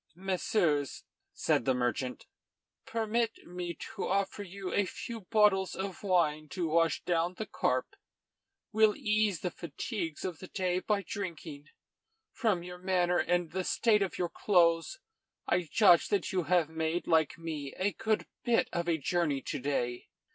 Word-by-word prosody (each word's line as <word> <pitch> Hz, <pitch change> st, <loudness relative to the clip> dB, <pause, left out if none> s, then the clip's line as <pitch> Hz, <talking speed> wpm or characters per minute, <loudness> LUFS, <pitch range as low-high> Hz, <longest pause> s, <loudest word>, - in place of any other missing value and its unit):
"Messieurs," 180 Hz, -, 0 dB, 0.3 s
said -, -, +1 dB
the 130 Hz, -, +3 dB
merchant, 125 Hz, +1 st, -2 dB, 0.6 s
"permit 225 Hz, 0 st, -1 dB
me 175 Hz, -1 st, -5 dB, 0.2 s
to -, -, -2 dB
offer 195 Hz, +1 st, 0 dB
you 195 Hz, -1 st, -6 dB
a 205 Hz, -2 st, +2 dB
few 230 Hz, +5 st, -6 dB
bottles 190 Hz, -2 st, +3 dB
of 190 Hz, -1 st, -5 dB
wine 155 Hz, -6 st, +1 dB
to 175 Hz, 0 st, -2 dB
wash 165 Hz, -1 st, +2 dB
down 175 Hz, +1 st, 0 dB
the 220 Hz, -, -4 dB
carp. -, -, -1 dB, 0.8 s
We'll 220 Hz, -1 st, +4 dB
ease 210 Hz, -4 st, +1 dB
the 180 Hz, -, -2 dB
fatigues 170 Hz, -, -5 dB
of 180 Hz, -4 st, -4 dB
the 185 Hz, -, -9 dB
day 185 Hz, -1 st, -1 dB
by 200 Hz, +1 st, 0 dB
drinking. 165 Hz, -7 st, -6 dB, 0.6 s
From 210 Hz, -8 st, 0 dB
your 180 Hz, 0 st, -8 dB
manner 180 Hz, -1 st, +2 dB
and 175 Hz, -2 st, +1 dB
the 190 Hz, -, -2 dB
state 215 Hz, +2 st, +3 dB
of 195 Hz, -, -1 dB
your 175 Hz, -1 st, -1 dB
clothes, 170 Hz, -, +2 dB, 0.5 s
I 175 Hz, -4 st, +1 dB
judge 195 Hz, -7 st, +6 dB
that 200 Hz, -3 st, 0 dB
you 180 Hz, -3 st, 0 dB
have 175 Hz, -3 st, +3 dB
made, 160 Hz, +2 st, -2 dB
like 160 Hz, -3 st, +2 dB
me, 155 Hz, -4 st, -5 dB
a 195 Hz, +2 st, +1 dB
good 220 Hz, +5 st, 0 dB, 0.2 s
bit 235 Hz, -1 st, +2 dB
of 170 Hz, 0 st, -1 dB
a 165 Hz, -, +2 dB
journey 150 Hz, -3 st, 0 dB
to 145 Hz, -, -3 dB
day." 125 Hz, -3 st, -2 dB
180 Hz, 155 wpm, -31 LUFS, 165-200 Hz, 0.8 s, judge